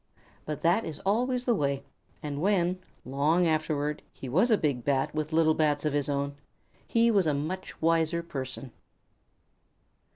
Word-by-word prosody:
But 150 -2 -4
that 175 +7 +3
is 160 - -6
always 245 +5 +1
the 240 - +3
way, 140 -7 0 0.4
and 145 -1 -4
when, 185 -1 +2 0.3
long 150 +7 +2
afterward, 155 -2 0
he 135 - -9
was 185 - +3
a 220 - +5
big 140 -8 -1
Bat 135 0 +1
with 155 0 -2
little 160 0 +4
Bats 150 -1 +1
of 150 - +1
his 145 0 0
own, 140 0 -1 0.5
he 230 0 +3
was 195 -6 +3
a 150 - +2
much 170 +7 -4
wiser 165 +1 +2
person. 130 -4 -6
155 Hz, 160 wpm, -28 LUFS, 145-180 Hz, 0.5 s, a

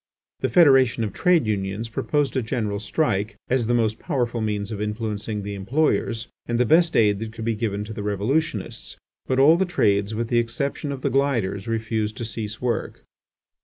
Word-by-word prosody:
The - - 0
Federation 135 -8 +5
of 105 -3 -3
Trade 180 -6 +3
Unions 100 +1 -2
proposed 145 +5 -1
a 130 - +2
general 110 -4 -2
strike 105 -2 -1 0.2
as 125 -3 +2
the 120 - +2
most 110 -2 +1
powerful 120 -7 -1
means 105 -1 -2
of 105 -1 -4
influencing 105 -1 -3
the 100 0 -5
employers, 115 +2 0 0.2
and 120 0 0
the 125 - +4
best 165 +6 +4
aid 105 -3 +4
that 110 0 -6
could 110 -1 -6
be 115 - +1
given 105 -2 -2
to 110 +1 -7
the 105 - -5
revolutionists, 105 +4 -2 0.3
but 130 - 0
all 150 +5 +6
the 190 - +2
trades 100 - +1
with 115 +1 -2
the 120 - +3
exception 140 +5 -2
of 135 -2 -6
the - - +1
gilders 115 -8 0
refused 110 -1 -2
to 120 - -4
cease 110 -1 -5
work. 120 -2 -3
115 Hz, 190 wpm, -23 LUFS, 105-130 Hz, 0.3 s, all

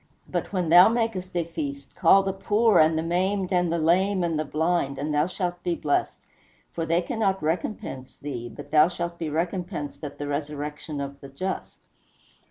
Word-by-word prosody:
But - - -3
when 180 -4 -1
thou 175 +5 +9
makest 225 -6 -1
a 170 - +2
feast, 140 -4 -6
call 195 +2 +5
the 195 0 -1
poor, 210 +3 +3
and 160 0 +4
the 160 - 0
maimed, 185 +3 0
and 175 -2 +2
the 170 - +1
lame, 185 +4 +2
and 165 -3 0
the - - +1
blind, 155 -2 0
and 150 +2 -2
thou 150 +2 +2
shalt 175 -1 -3
be 175 -1 -1
blessed; 145 -3 0 0.5
for 165 -1 -3
they 170 +2 +2
cannot 195 -4 -1
recompense 160 -5 -3
thee, 125 -5 -6
but - - -11
thou 155 +1 +6
shalt 170 -1 -5
be 160 - -2
recompensed 170 -2 -3
at 145 -1 -6
the 145 - -4
resurrection 150 +1 -4
of 140 0 -6
the 140 - -10
just." 185 +8 -4
170 Hz, 185 wpm, -25 LUFS, 150-185 Hz, 0.5 s, thou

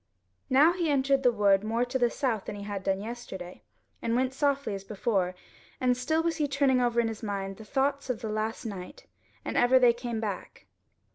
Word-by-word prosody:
Now 290 +6 +6
he 345 -3 -1
entered 275 -1 +2
the 250 -2 +4
wood 200 -3 +3
more 230 +3 0
to 260 +2 -2
the 240 -1 +3
south 235 -6 -1
than - - -5
he 200 - -7
had 200 -1 -5
done 195 0 0
yesterday, 200 -6 -7 0.4
and 230 0 0
went 255 +1 +1
softly 280 -5 0
as 195 -1 -5
before, 195 -3 -1 0.4
and 250 -1 +2
still 315 +6 0
was 330 -1 0
he 300 -2 +1
turning 275 -2 +2
over 240 -1 +2
in 235 - +2
his 225 -1 -5
mind 195 -3 -4
the 220 - -11
thoughts 275 +4 0
of 245 -1 -3
last 220 +1 -3
night, 200 - -7 0.4
and - - -3
ever 245 +2 +5
they 245 -2 +6
came 235 -1 -4
back. 210 -4 -5
240 Hz, 205 wpm, -28 LUFS, 210-265 Hz, 0.4 s, Now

